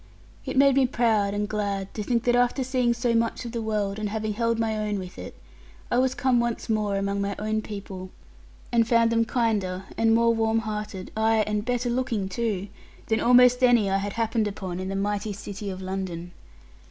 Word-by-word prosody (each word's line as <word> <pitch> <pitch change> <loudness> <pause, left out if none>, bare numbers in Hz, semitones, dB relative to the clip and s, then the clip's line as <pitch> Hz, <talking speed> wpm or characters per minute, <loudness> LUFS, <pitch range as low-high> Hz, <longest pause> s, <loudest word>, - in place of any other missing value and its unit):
It - - -3
made 275 0 +6
me 265 -2 +4
proud 220 -5 +1
and 205 0 -1
glad 200 -2 -3
to 215 - -4
think 235 +2 0
that 240 0 +3
after 245 +2 +2
seeing 250 -2 +1
so 235 0 0
much 230 +2 0
of 235 - -5
the 230 -1 -3
world, 210 -2 -1
and 210 -1 -2
having 215 0 -2
held 230 +1 0
my 225 -1 0
own 210 -1 -1
with 185 -1 -8
it, - - -9 0.5
I 245 - +3
was 260 0 +1
come 255 -2 +2
once 235 -1 -2
more 210 -2 0
among 200 0 -1
my 200 0 -2
own 215 +1 -1
people, 195 -3 -7 0.6
and 230 -1 +3
found 230 -1 +4
them 230 0 +2
kinder, 205 -7 0 0.2
and 225 0 +4
more 230 0 +4
warm 225 0 +1
hearted, 210 -3 -5
ay 220 0 +3
and 210 -1 -1
better 245 0 0
looking 235 -6 -1
too, 205 -1 -2 0.4
than 220 0 +2
almost 250 +1 +5
any 235 -6 +4
I 195 - +3
had 200 0 -4
happened 225 -1 0
upon 190 -3 -5
in 185 0 -4
the 195 - -3
mighty 205 +1 -1
city 200 +1 -6
of 190 0 -6
London. 185 -2 -4
215 Hz, 205 wpm, -25 LUFS, 200-235 Hz, 0.6 s, made